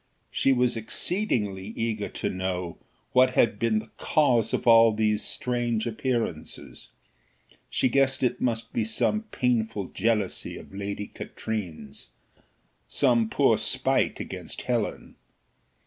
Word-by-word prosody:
She 135 - +2
was 125 -2 +2
exceedingly 110 - -1
eager 110 -2 -2
to - - -3
know 90 -2 -3 0.3
what 130 0 +4
had 105 -3 +3
been 115 -2 +2
the 110 +1 -4
cause 120 -7 +2
of - - -1
all 115 -1 +7
these 105 -1 +1
strange 120 -2 -1
appearances. 115 - -3 0.8
She - - +2
guessed 135 +1 +2
it 125 0 0
must 115 -2 -1
be 115 - +1
some 115 - 0
pitiful 115 -5 0
jealousy 110 -4 -1
of - - -12
Lady 100 +1 -4
Katrine's 100 -6 -6 0.8
some 120 -5 +2
poor - - +3
spite - - 0
against - - -6
Helen. - - -2
115 Hz, 120 wpm, -26 LUFS, 105-125 Hz, 0.8 s, all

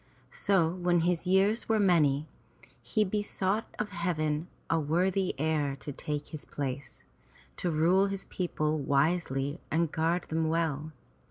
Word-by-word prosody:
So 175 -5 +2
when 175 -1 +2
his 175 +1 0
years 195 +5 +3
were 220 -1 +3
many, 155 -7 +3 0.5
he 120 - +1
besought 205 +1 -1
of 210 - -2
Heaven 155 -2 -1 0.2
a 165 - +2
worthy 180 +5 +1
heir 150 -2 0
to 140 +2 -7
take 145 +1 -4
his 155 - -7
place, 140 -1 -5 0.5
to 180 - -1
rule 175 +5 +3
his 195 -1 -4
people 155 -4 -1
wisely 140 0 0
and 165 -1 +1
guard 165 +2 +1
them 160 0 0
well. 160 -2 -1
165 Hz, 140 wpm, -30 LUFS, 150-185 Hz, 0.5 s, years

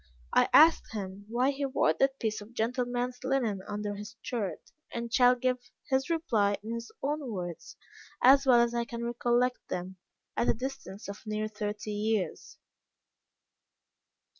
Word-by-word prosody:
I - - +4
asked 320 -6 +6
him 200 -1 -6
why 250 +4 +2
he 280 +1 -4
wore 270 -1 +2
that 270 0 +1
piece 215 -2 -1
of 220 +3 -13
gentleman's 245 +2 -1
linen 250 -7 0
under 205 0 -3
his 205 +1 -8
shirt, 220 -6 -4 0.2
and 235 0 -5
shall 250 -1 +6
give 255 0 0 0.3
his 265 +4 +2
reply 225 -12 +1
in 225 +2 -4
his 230 0 -6
own 285 -2 -2
words 175 -4 -6 0.4
as 275 +2 +7
well 250 -3 +6
as 235 0 +1
I 235 0 0
can 235 0 -6
recollect 240 +1 +1
them, 185 +1 -4 0.4
at - - +1
a - - +4
distance 250 -6 -6
of 200 0 -7
near 215 0 -1
thirty 210 0 -4
years. 210 -1 -2
235 Hz, 155 wpm, -30 LUFS, 210-255 Hz, 0.4 s, as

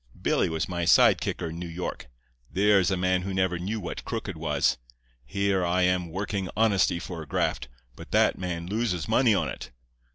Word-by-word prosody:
Billy - - +1
was 80 -1 -2
my 85 -2 -3
side 85 - +5
kicker 85 - -3
in 80 +1 -7
New 90 - -5
York. 85 +2 -5 0.4
There 100 +1 +4
is 90 - +2
a 95 - 0
man 90 0 +1
who 95 +1 -4
never 95 -2 0
knew 105 +5 -3
what 90 - -6
crooked - - -4
was. - - 0 0.4
Here 95 +7 0
I 90 +1 +1
am 90 -1 +1
working 95 +1 -3
Honesty 105 -5 +3
for 85 -1 -6
a 80 - -9
graft, 65 -2 -1 0.3
but - - -11
that - - +3
man 90 -2 -4
loses 95 -5 -1
money 120 -5 +4
on - - 0
it. - - -7
90 Hz, 195 wpm, -27 LUFS, 85-100 Hz, 0.4 s, side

